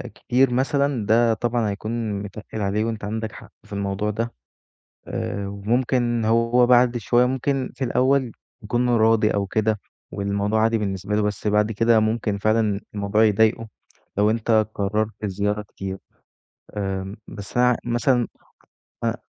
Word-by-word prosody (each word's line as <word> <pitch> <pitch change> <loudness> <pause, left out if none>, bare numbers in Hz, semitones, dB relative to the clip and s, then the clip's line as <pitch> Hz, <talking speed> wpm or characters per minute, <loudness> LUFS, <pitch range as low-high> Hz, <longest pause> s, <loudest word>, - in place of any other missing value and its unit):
كتير 125 0 +2
مثلًا 135 -2 +1
ده 115 +2 +4
طبعًا 120 0 0
هيكون 110 +2 -3
متقِّل 105 +2 -7
عليه 105 +2 0
وأنت 115 -2 -4
عندك 110 +1 -3
حق - - -13
في - - -12
الموضوع 100 +1 -2
ده 115 +3 -3 0.7
آآ 100 -1 -3
وممكن 120 +3 0
هو 115 +2 +3
بعد 125 0 +5
شوية 120 +2 +3
ممكن 130 +1 -1
في 135 - -3
الأول 130 0 +2 0.3
يكون 120 +4 0
راضي 110 -2 +4
أو 100 -1 0
كده 110 +1 0 0.3
والموضوع 100 +2 0
عادي 115 +1 +3
بالنسبة 100 -1 -2
له، 105 - +2
بس 105 0 -2
بعد 105 +1 +2
كده 115 +1 +3
ممكن 110 -1 0
فعلًا 110 -1 +1
الموضوع 105 +1 +1
يضايقه 110 +1 +3 0.5
لو 105 +1 +4
أنت 110 -1 +2
قرّرت 105 +2 -1
الزيارة 105 +1 -1
كتير. 95 -2 -7 0.8
آمم 95 0 -3
بس 100 +3 -8
أنا 125 0 +5
ع - - +2
مثلًا 120 0 +1 0.8
أ - - +1
110 Hz, 145 wpm, -23 LUFS, 105-120 Hz, 0.8 s, بعد